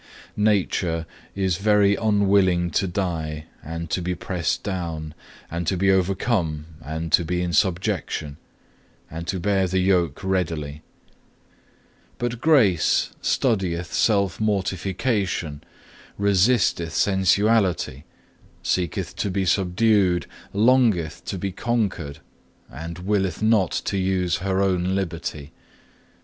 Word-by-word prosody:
3. 105 - -2
"Nature 90 -5 +1 0.3
is 95 -3 0
very 100 0 +4
unwilling 100 -5 +2
to 95 - +1
die, 80 -5 -3 0.2
and 80 +2 -5
to 90 - 0
be 90 +1 -2
pressed 90 -1 -2
down, 85 -5 -4 0.4
and 85 0 -3
to 95 - +1
be 95 +2 +3
overcome, 95 -4 0 0.2
and 80 +2 -4
to 85 - +5
be 90 +2 -1
in 85 -1 -2
subjection, 80 -4 0 0.7
and 85 +2 -6
to 95 - -2
bear 95 0 +1
the 95 +1 -1
yoke 90 -4 +1
readily; 80 -6 -2 1.4
but 120 -1 -3
Grace 115 - +3
studieth 95 -8 0
self 100 -5 +2
mortification, 95 - -1 0.5
resisteth 100 -4 +2
sensuality, 95 - +2 0.6
seeketh 95 0 -1
to 100 - -1
be 95 0 -1
subdued, 95 0 +2 0.3
longeth 110 - +2
to 95 - -4
be 95 +2 -3
conquered, 100 -9 -2 0.5
and 80 +6 -7
willeth 95 -2 0
not 110 -5 +3
to 100 - -2
use 95 -2 +1
her 95 +1 0
own 95 -1 +1
liberty. 85 -5 -4
95 Hz, 115 wpm, -23 LUFS, 85-100 Hz, 1.4 s, to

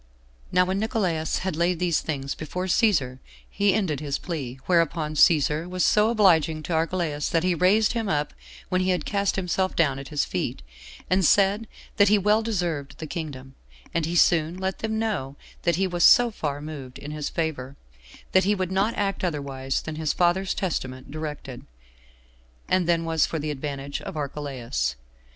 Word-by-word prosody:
7. - - -27
Now 180 0 +5
when 190 +2 -1
Nicolaus 185 -8 0
had 190 -4 -1
laid 170 +2 +1
these 175 -2 +1
things 140 -3 -3
before 180 +4 -5
Cæsar, 170 - +2 0.3
he 200 -1 +1
ended 175 -10 0
his 140 -2 -2
plea; 140 -8 -5
whereupon 165 -3 +1
Cæsar 155 +1 +3
was 180 -1 0
so 210 +1 +4
obliging 165 -8 +3
to 170 - -3
Archelaus, 160 -2 -1
that 165 -2 +1
he 180 0 +2
raised 195 +6 +3
him 225 -4 -2
up 150 -2 -1 0.4
when 185 0 +1
he 185 - 0
had 180 -5 0
cast 200 -1 0
himself 185 0 -1
down 140 -5 +2
at 135 - -8
his 150 -2 0
feet, - - -3 0.4
and 185 +1 +2
said 200 +5 +3 0.3
that 205 -2 +6
he 210 - +5
well 210 +2 +3
deserved 175 -10 -2
the 160 - -6
kingdom; 140 -5 -6 0.4
and 165 -2 0
he 170 - -3
soon 165 0 +3
let 190 0 -3
them 220 0 -2
know 200 -12 -2 0.3
that 170 -2 +2
he 190 +3 +1
was 175 -2 -1
so 245 -1 +7
far 145 -8 -4
moved 145 -4 -8
in 145 - -8
his 150 -1 -3
favor, 140 -5 -3 0.6
that 190 - +4
he 205 +3 +2
would 185 -2 -2
not 200 +4 +1
act 195 -1 -1
otherwise 140 -5 -2
than 155 -1 -6
his 155 -1 0
father's 180 +2 +1
testament 130 -8 -3
directed, 150 -4 -6 1.0
and 185 -2 +2
than 165 -1 +2
was 160 -2 +2
for 165 - -3
the 150 0 -3
advantage 140 0 -5
of 195 -5 -7
Archelaus. 130 - -3
165 Hz, 180 wpm, -25 LUFS, 150-190 Hz, 1.0 s, so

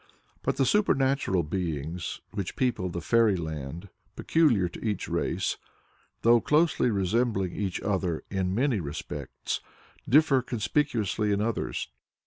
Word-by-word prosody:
But - - -1
the 135 - +3
supernatural 135 - +2
beings 80 0 -3
which 100 -4 -4
people 120 -8 0
the 85 0 -4
fairy 115 +3 +3
land 80 +1 -5 0.3
peculiar 130 - +3
to 85 - -10
each 105 -4 -2
race, - - -1 0.7
though 115 0 +6
closely 155 -4 +3
resembling 100 -2 0
each 95 -3 -2
other 95 -5 -1
in 95 -1 -1
many 125 -2 +2
respects, 70 -5 -5 0.5
differ 140 -1 +5
conspicuously 115 -3 0
in 100 - +1
others. 110 +1 -2
100 Hz, 120 wpm, -28 LUFS, 90-125 Hz, 0.7 s, though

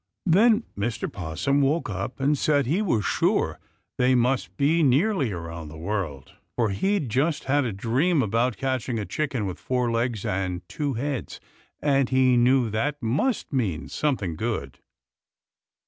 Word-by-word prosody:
Then 215 +6 +4
Mr. 110 +3 -2
'Possum 90 - 0
woke 145 +5 +1
up 100 +5 -4
and 140 +2 +2
said 145 -1 +2
he 165 - +1
was 120 - 0
sure - - +1 0.4
they 130 +1 +4
must 125 +1 0
be 155 +4 +3
nearly 145 - +2
around 85 -3 -6
the 75 +1 -10
world, 80 -6 -4 0.2
for 115 -4 +1
he'd 190 - 0
just 140 +8 0
had 145 +1 +1
a 115 - -1
dream 130 - +1
about 115 +2 0
catching 130 -3 -2
a 105 - -3
chicken 135 -6 -2
with 95 -2 -5
four 125 -2 0
legs 115 -2 -1
and 90 -2 -2
two 145 -4 -3
heads, 135 +1 -3 0.4
and 140 -3 +2
he 130 -1 +4
knew 120 -1 +3
that 145 +7 -1
must 150 - 0
mean 85 - -1
something 115 - -1
good. 75 - -3
125 Hz, 155 wpm, -25 LUFS, 100-145 Hz, 0.4 s, Then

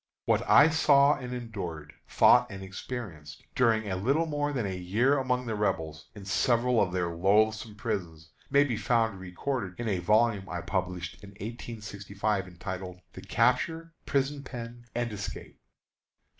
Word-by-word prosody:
What - - +3
I 150 +3 +8
saw 145 -2 +5
and 125 -1 -6
endured, 95 -11 -6 0.2
thought - - +5
and 95 -1 -7
experienced, 95 -6 -7
during 115 -4 +2
a 95 - -1
little 135 - +1
more 145 -2 -1
than 125 -6 -1
a 95 -1 -3
year 105 +10 +2
among 125 -1 0
the 115 - -2
Rebels, 90 -7 -2
in 100 -2 -10
several 120 +3 +2
of 95 - +1
their 90 -2 -1
loathsome 110 +4 +2
prisons, 85 -5 -4 0.2
may 140 +1 +5
be 125 -6 -2
found 115 -1 +1
recorded 95 +2 -4
in 120 - -2
a 100 -4 0
volume 105 +1 +2
I 90 -1 -3
published 90 -1 -3
in 100 - -10
1865, 105 -2 -4
entitled 90 0 -7
"The 95 - -9
Capture, 125 - +1
Prison 140 0 0
Pen, 120 -2 -8
and 120 -2 -1
Escape." 100 -1 -7
105 Hz, 155 wpm, -29 LUFS, 95-125 Hz, 0.2 s, I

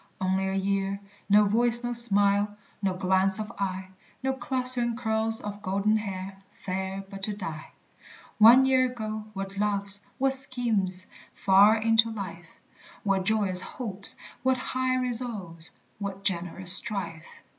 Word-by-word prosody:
Only 190 0 -1
a 190 - -3
year, 195 0 -2 0.3
no 210 +1 +5
voice, 235 +3 +2
no 240 0 -3
smile, 205 -3 0 0.2
No 190 -2 -1
glance 190 +2 +4
of 215 +1 -6
eye, 190 -1 -4 0.3
No 265 0 0
clustering 255 -2 -2
curls 225 -1 -1
of 205 0 -8
golden 200 +3 0
hair, 195 -2 -7
Fair 190 +1 -6
but 195 0 -11
to 210 +2 -2
die! 165 -6 -8 0.7
One 240 +5 +7
year 260 -1 +2
ago, 215 -3 -6
what 195 0 -7
loves, 205 -1 +1 0.2
what 270 0 +4
schemes 225 -9 +3 0.3
Far 200 +3 +4
into 225 +1 +2
life! 175 -6 -9 0.4
What 195 -2 -1
joyous 200 -3 +2
hopes, 200 -5 -2 0.3
what 260 0 +1
high 255 0 -2
resolves, 230 -10 -5 0.3
What 195 -1 -6
generous 180 -1 +5
strife! 175 -5 +1
205 Hz, 135 wpm, -26 LUFS, 190-230 Hz, 0.7 s, One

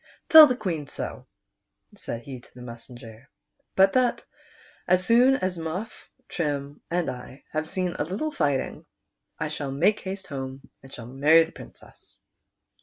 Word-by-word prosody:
Tell 315 -1 +11
the 250 - 0
Queen 165 - -3
so," - - -6 0.7
said 115 0 -6
he 130 -1 -8
to 120 - -20
the 125 - -10
mes 115 -1 -10
senger; 120 -1 -13 0.5
"but 195 0 +5
that 255 -1 +2 0.6
as 185 0 +3
soon 245 +3 +5
as 185 -7 -2
Muff, 170 +8 -6 0.2
Trim, 145 -3 -3
and 175 0 0
I 125 +2 -7
have 155 0 -2
seen 180 -1 -2
a - - +2
little 200 - -3
fighting, 145 - -1 0.5
I - - -3
shall 140 -2 -4
make 180 +10 +2
haste 190 +1 -6
home, 135 -2 -7
and 130 -1 -11
marry 160 +3 +7
the 160 - -10
Princess." - - -15
155 Hz, 155 wpm, -26 LUFS, 135-190 Hz, 0.7 s, Tell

